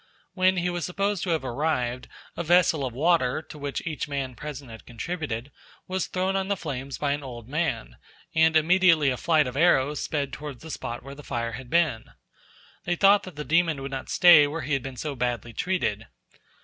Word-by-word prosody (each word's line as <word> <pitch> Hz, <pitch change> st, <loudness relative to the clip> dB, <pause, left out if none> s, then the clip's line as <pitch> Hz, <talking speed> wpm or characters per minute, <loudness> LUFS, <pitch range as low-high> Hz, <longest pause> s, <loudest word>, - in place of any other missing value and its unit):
When 185 Hz, 0 st, +3 dB
he 180 Hz, 0 st, 0 dB
was 175 Hz, -1 st, -3 dB
supposed 195 Hz, +3 st, -1 dB
to -, -, -3 dB
have 160 Hz, -5 st, 0 dB
arrived, 125 Hz, -2 st, -1 dB, 0.3 s
a -, -, -3 dB
vessel 170 Hz, -3 st, +3 dB
of 130 Hz, -, -2 dB
water, 145 Hz, 0 st, +2 dB
to 155 Hz, -, -12 dB
which 140 Hz, -1 st, -4 dB
each 155 Hz, -3 st, -3 dB
man 135 Hz, -3 st, -3 dB
present 140 Hz, -1 st, -8 dB
had 110 Hz, -, -11 dB
contributed, 135 Hz, -1 st, -4 dB, 0.4 s
was 185 Hz, 0 st, -2 dB
thrown 185 Hz, +1 st, -1 dB
on 190 Hz, 0 st, 0 dB
the 200 Hz, 0 st, 0 dB
flames 135 Hz, -4 st, -5 dB
by 145 Hz, -1 st, 0 dB
an 145 Hz, +1 st, -1 dB
old 120 Hz, -4 st, -9 dB
man, 135 Hz, -, -2 dB, 0.4 s
and 160 Hz, 0 st, +4 dB
immediately 165 Hz, -3 st, +4 dB
a -, -, -1 dB
flight 160 Hz, 0 st, +3 dB
of 125 Hz, 0 st, -5 dB
arrows 150 Hz, -2 st, +3 dB
sped 140 Hz, -3 st, -2 dB
towards 150 Hz, -3 st, -7 dB
the 160 Hz, -, -8 dB
spot 120 Hz, -4 st, -5 dB
where 135 Hz, +1 st, -9 dB
the 145 Hz, -, -11 dB
fire 115 Hz, -4 st, -3 dB
had 120 Hz, +2 st, -8 dB
been. 165 Hz, -9 st, +1 dB, 0.8 s
They 175 Hz, -, 0 dB
thought 200 Hz, +2 st, +5 dB
that 185 Hz, -, -10 dB
the 150 Hz, -, -5 dB
demon 165 Hz, 0 st, +2 dB
would 135 Hz, -, -5 dB
not 135 Hz, -1 st, -5 dB
stay 170 Hz, -5 st, +7 dB
where 155 Hz, +3 st, -4 dB
he 150 Hz, -, -3 dB
had 135 Hz, -, +1 dB
been 130 Hz, 0 st, -7 dB
so 150 Hz, +1 st, -3 dB
badly 120 Hz, -2 st, -2 dB
treated. 175 Hz, -, -1 dB
150 Hz, 205 wpm, -26 LUFS, 130-170 Hz, 0.8 s, stay